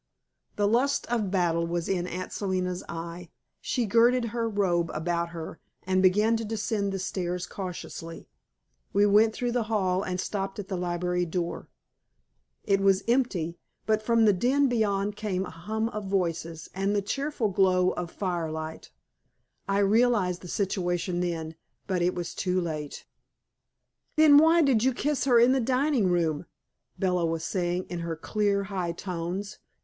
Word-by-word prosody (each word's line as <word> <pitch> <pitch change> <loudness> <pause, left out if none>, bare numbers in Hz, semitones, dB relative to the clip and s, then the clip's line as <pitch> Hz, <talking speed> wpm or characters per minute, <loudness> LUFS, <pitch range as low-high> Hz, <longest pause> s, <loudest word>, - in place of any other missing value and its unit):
The 205 -1 +2
lust 265 +6 +2
of 220 -5 0
battle 170 -3 +1
was 170 0 -2
in 180 -2 -1
Aunt 180 +1 -5
Selina's 185 -2 -2
eye. 170 +1 -6 0.3
She 245 -3 -1
girded 235 +3 +3
her 230 -1 -1
robe 180 -5 +1
about 170 +2 -1
her 165 -1 -7 0.2
and 185 0 +1
began 210 +5 +4
to 225 - -4
descend 210 -2 -1
the 195 - -2
stairs 180 -1 -3
cautiously. 180 -3 -7 0.7
We 205 +1 +4
went 215 +2 +4
through 245 -1 -1
the 240 -2 0
hall 190 -4 +1
and 185 -2 -3
stopped 195 0 -3
at 205 -1 -6
the 190 - -2
library 180 0 -1
door. 170 +1 -3 1.0
It 195 0 +2
was 195 0 +3
empty, 195 -10 0 0.3
but 215 0 +2
from 230 0 +3
the 210 - +5
den 265 +9 +2
beyond 205 -4 0
came 190 -3 -2
a - - -8
hum 215 +7 -3
of 210 -2 -5
voices 165 -4 -2
and 195 +2 0
the 200 - +1
cheerful 275 0 -1
glow 185 -1 +3
of 175 -1 -4
fire 175 -4 -2
light. 160 0 -6 0.8
I 195 - +2
realized 205 -3 +2
the 180 - -9
situation 175 -2 -1
then, 165 -3 -2 0.3
but 185 -3 -1
it 180 +1 +1
was 175 -2 -4
too 185 -1 0
late. 155 -4 -5 1.1
"Then 305 -2 +8
why 325 +2 +5
did 255 -6 +3
you 260 -1 +2
kiss 290 +1 0
her 245 -3 +5
in 240 +2 +6
the 265 - +3
dining 255 -2 +2
room?" 165 -2 0 0.5
Bella 180 -2 +1
was 165 0 -2
saying 175 0 -1
in 175 - -5
her 170 -1 -3
clear, 200 +4 0
high 185 -3 -3
tones. 180 +3 -5
190 Hz, 165 wpm, -27 LUFS, 175-220 Hz, 1.1 s, Then